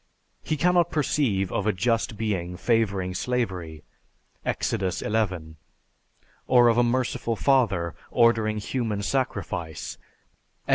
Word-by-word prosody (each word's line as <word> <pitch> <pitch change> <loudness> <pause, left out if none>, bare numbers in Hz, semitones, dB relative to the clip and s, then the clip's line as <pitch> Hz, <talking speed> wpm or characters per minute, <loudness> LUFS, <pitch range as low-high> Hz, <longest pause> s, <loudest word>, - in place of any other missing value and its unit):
He 155 - -2
cannot 175 +1 +3
perceive 120 - 0
of 105 - -1
a - - +4
just 115 +2 0
being 95 -5 -2
favoring 100 -4 +1
slavery 90 -9 -3 0.6
(Ex. - - -1
XI), 95 -4 -1 0.9
or 125 -2 +6
of 115 +1 +3
a - - +5
merciful 120 -1 0
father 105 - +2 0.2
ordering 115 -3 +3
human 105 -2 -2
sacrifice 100 - -3 0.7
(Ex. - - -15
110 Hz, 110 wpm, -25 LUFS, 95-125 Hz, 0.9 s, or